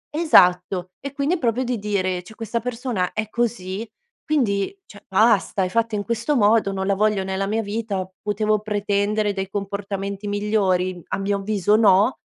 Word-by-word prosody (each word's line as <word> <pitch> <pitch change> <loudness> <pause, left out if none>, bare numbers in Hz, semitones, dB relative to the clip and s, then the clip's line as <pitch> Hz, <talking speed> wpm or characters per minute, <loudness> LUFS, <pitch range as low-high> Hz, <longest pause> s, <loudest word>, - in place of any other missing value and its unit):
Esatto, 180 - +4
e 280 - -6
quindi 280 +5 0
è - - -5
proprio 245 -1 0
di 245 -2 -2
dire: 185 -3 -1
"Cioè, 220 +5 -14
questa 230 +1 -3
persona 230 -5 -3
è 215 0 -2
così, 215 -4 -2 0.4
quindi 250 - 0
cioè, 205 -1 -15
basta! 200 -1 +3
È 185 - -1
fatta 230 +2 0
in 205 - -2
questo 235 +6 -1
modo, 215 -3 +3
non 190 0 -3
la 200 - +2
voglio 210 0 +1
nella 190 +1 -2
mia 220 +2 -1
vita. 205 -3 -3
Potevo 210 +1 0
pretendere 205 0 0
dei 195 -1 -4
comportamenti 200 0 -4
migliori? 195 -3 0
A - - -1
mio 200 +1 -1
avviso 205 0 +1
no." 215 +2 +4
205 Hz, 170 wpm, -22 LUFS, 195-225 Hz, 0.4 s, Esatto